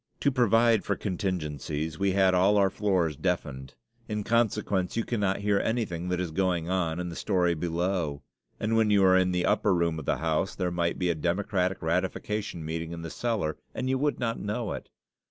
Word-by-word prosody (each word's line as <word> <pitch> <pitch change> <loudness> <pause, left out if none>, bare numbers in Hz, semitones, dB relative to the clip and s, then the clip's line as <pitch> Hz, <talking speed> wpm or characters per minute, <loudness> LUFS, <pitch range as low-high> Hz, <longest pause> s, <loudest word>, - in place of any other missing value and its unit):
To 140 - +3
provide 115 -3 +4
for - - 0
contingencies, 80 -5 -3
we 100 -1 +2
had 95 -1 +4
all 95 +3 +4
our 100 -2 +3
floors 95 -8 +1
deafened. 70 -5 -3 0.3
In 105 -1 -2
consequence, 105 -4 0
you 115 - +1
cannot 100 -5 -1
hear 100 -1 +2
anything 90 -7 -2
that 90 -1 0
is 90 -3 -2
going 90 -1 0
on 85 -3 0
in 90 0 -3
the 85 - -7
story 90 -3 +1
below; 85 -3 -2 0.4
and 110 +1 0
when 110 -1 +3
you 100 -2 +4
are 95 0 +6
in 95 0 +3
the 90 -1 0
upper - - +2
room 85 -2 0
of 75 - -8
the - - +1
house 80 +3 -1
there 90 -2 -1
might 85 -1 0
be 90 -2 +1
a - - +1
democratic 90 +3 -1
ratification 95 +1 -2
meeting 80 +1 -4
in 85 -1 -7
the 80 - -6
cellar 110 -10 -1 0.2
and 130 +1 -1
you 130 - +1
would 145 +1 0
not 115 -2 -1
know 105 +2 -3
it. - - -8
95 Hz, 200 wpm, -28 LUFS, 85-105 Hz, 0.4 s, are